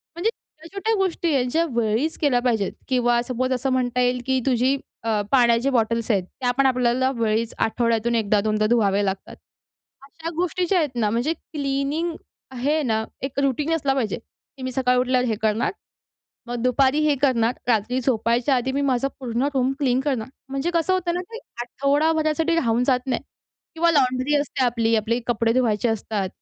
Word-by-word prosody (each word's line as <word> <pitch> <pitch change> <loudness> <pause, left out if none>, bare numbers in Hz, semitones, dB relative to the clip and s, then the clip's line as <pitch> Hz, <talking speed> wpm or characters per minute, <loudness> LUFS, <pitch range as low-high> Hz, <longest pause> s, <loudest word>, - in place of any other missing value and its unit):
म्हणजे 355 +6 0 0.3
छोट्या-छोट्या 395 +7 -3
गोष्टी 350 -4 0
आहेत 250 -2 +1
ज्या 330 +4 +2
वेळीच 235 +6 0
केल्या 280 -5 +2
पाहिजेत 225 -5 0 0.2
किंवा 240 -2 +2
सपोज 255 +1 -2
असं 255 +1 -1
म्हणता 250 -1 0
येईल 250 0 +1
की 265 0 +1
तुझी 260 +1 +2 0.3
अ, 220 -2 +1
पाण्याची 240 -1 +4
बॉटल्स 230 -2 0
आहेत, 195 -3 +1 0.2
त्या 245 -1 +2
पण 275 - +3
आपल्याला 255 0 +2
वेळीच 225 0 0
आठवड्यातून 230 0 +1
1दा-2दा 215 0 +1
धुवाव्या 205 -4 +3
लागतात. 195 -1 -4 0.7
अशा 325 +4 -7
गोष्टी 360 +1 0
ज्या 390 - +3
आहेत 295 -6 -2
ना 220 -3 +1
म्हणजे 240 +9 0
क्लीनिंग 290 +2 -3 0.4
आहे 280 +5 0
ना, 220 -4 0 0.2
एक 270 +1 -3
रूटीन 280 +3 0
असला 280 -4 0
पाहिजे, 235 -7 -1 0.4
की 265 - -8
मी 255 - -3
सकाळी 250 -1 +1
उठल्यावर 250 0 +1
हे 225 - 0
करणार, 220 +1 +1 0.8
मग 240 -1 -4
दुपारी 265 +3 +3
हे 295 - +4
करणार, 240 -4 +3 0.2
रात्री 235 +2 +1
झोपायच्या 235 +1 +1
आधी 255 +2 -1
मी 280 - 0
माझं 270 -1 +1
पूर्ण 250 +2 -1
रूम 260 0 +2
क्लीन 260 -3 +1
करणार. 265 -5 -2 0.2
म्हणजे 275 +5 -2
कसं 335 +2 +2
होतं 365 -2 0
ना, 355 - -1
की 460 - -7 0.2
आठवडाभरासाठी 310 +5 +1
राहून 240 -5 +1
जात 255 -1 +2
नाही 255 -3 -1 0.5
किंवा 335 +1 +3
लॉन्ड्री 260 0 +2
असते 285 -2 0
आपली, 230 -2 +1
आपले 225 +3 0
कपडे 230 -1 +1
धुवायचे 235 -2 +1
असतात. 215 -3 -2
255 Hz, 175 wpm, -23 LUFS, 230-280 Hz, 0.8 s, पाण्याची